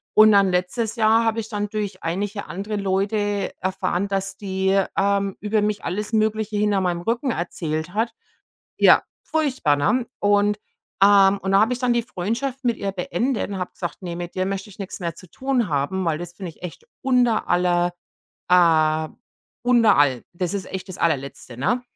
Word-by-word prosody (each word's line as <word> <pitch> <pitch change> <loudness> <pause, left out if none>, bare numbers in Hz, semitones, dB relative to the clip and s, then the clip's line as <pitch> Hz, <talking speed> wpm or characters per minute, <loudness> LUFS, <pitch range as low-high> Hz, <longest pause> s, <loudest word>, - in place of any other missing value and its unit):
Und 215 0 +8
dann 200 -2 +5
letztes 185 +6 -1
Jahr 225 0 +4
habe 225 0 +1
ich 220 0 -5
dann 205 -1 -3
durch 205 -3 -4
einige 200 +5 -3
andere 205 +3 -4
Leute 200 +1 0
erfahren, 185 0 -1
dass 195 0 -2
die, 190 0 +1 0.2
ähm, 200 0 +1
über 210 0 +1
mich 210 0 -1
alles 210 +5 -3
Mögliche 215 -1 0
hinter 205 -2 +2
meinem 175 -2 -1
Rücken 235 +8 -1
erzählt 165 -2 -3
hat. 225 +2 0 0.7
Ja, - - +6 0.2
furchtbar, 270 - +1
ne? 215 - +1
Und, 205 0 +3 0.4
ähm 200 0 +6
und 190 - -1
da 195 - +6
habe 225 +3 +3
ich - - -6
dann 250 -1 +1
die 235 - +1
Freundschaft 245 +7 -3
mit 235 -2 +1
ihr 200 - -2
beendet 205 +7 -1
und 195 - -4
habe 180 - -4
gesagt: 175 +1 -6
„Ne, 175 -2 -5
mit 175 0 -6
dir 185 - 0
möchte 195 +1 -4
ich 195 - -16
nichts 195 - -6
mehr 170 -2 -3
zu 170 0 -15
tun 260 -6 -1
haben, 150 +6 -1
weil 160 -2 0
das 175 0 -6
finde 185 -1 -6
ich 160 - -22
echt 180 - -8 0.2
unter 250 -4 +2
aller, 175 0 +2 0.5
äh 160 -3 +4 0.6
unter 240 -3 +5
all. 135 -4 +3
Das 180 +1 -2
ist 195 - -3
echt 190 0 -5
das 185 - -8
Allerletzte.“ 140 -6 -2
Ne? 245 - 0
195 Hz, 185 wpm, -22 LUFS, 180-215 Hz, 0.7 s, Und